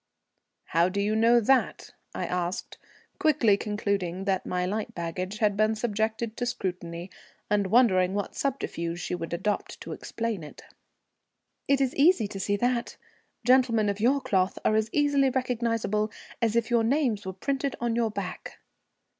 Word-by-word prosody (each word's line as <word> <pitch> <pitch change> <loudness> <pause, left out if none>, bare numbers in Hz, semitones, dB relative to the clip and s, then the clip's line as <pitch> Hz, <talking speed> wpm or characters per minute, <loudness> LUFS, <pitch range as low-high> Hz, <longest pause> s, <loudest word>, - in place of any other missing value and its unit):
"How 170 +2 +3
do 200 +2 -3
you 210 +2 +1
know 230 +2 +5
that?" 255 +3 +1 0.2
I - - -2
asked, 180 +3 -3 0.4
quickly 270 -10 +4
concluding 200 -3 -2
that 190 -2 0
my 180 0 -1
light 210 +3 -3
baggage 180 +4 -4
had 210 -2 +2
been 215 +1 +2
subjected 220 0 -2
to 245 - -1
scrutiny, 180 -5 -4 0.4
and 205 -2 +2
wondering 190 -4 +4
what 205 -1 -2
subterfuge 170 -11 -3
she - - -4
would 165 -2 -4
adopt 190 +4 -2
to - - -7
explain 230 -5 -4
it. 150 - -11 1.0
"It 275 -1 +3
is 270 -2 +1
easy 285 - +4
to 195 - -6
see 205 +1 0
that. 240 +2 -1 0.5
Gentlemen 245 -4 +4
of 200 0 -2
your 265 +6 +3
cloth 190 -5 +1
are - - +4
as 220 0 +1
easily 285 -2 +3
recognizable 230 -4 -1 0.3
as 230 -1 +1
if 235 +1 +1
your 235 -1 +4
names 245 -4 +1
were 190 -1 -5
printed 275 +7 -2
on 235 -1 0
your 230 -1 +1
back." 200 -3 -6
215 Hz, 160 wpm, -27 LUFS, 190-240 Hz, 1.0 s, know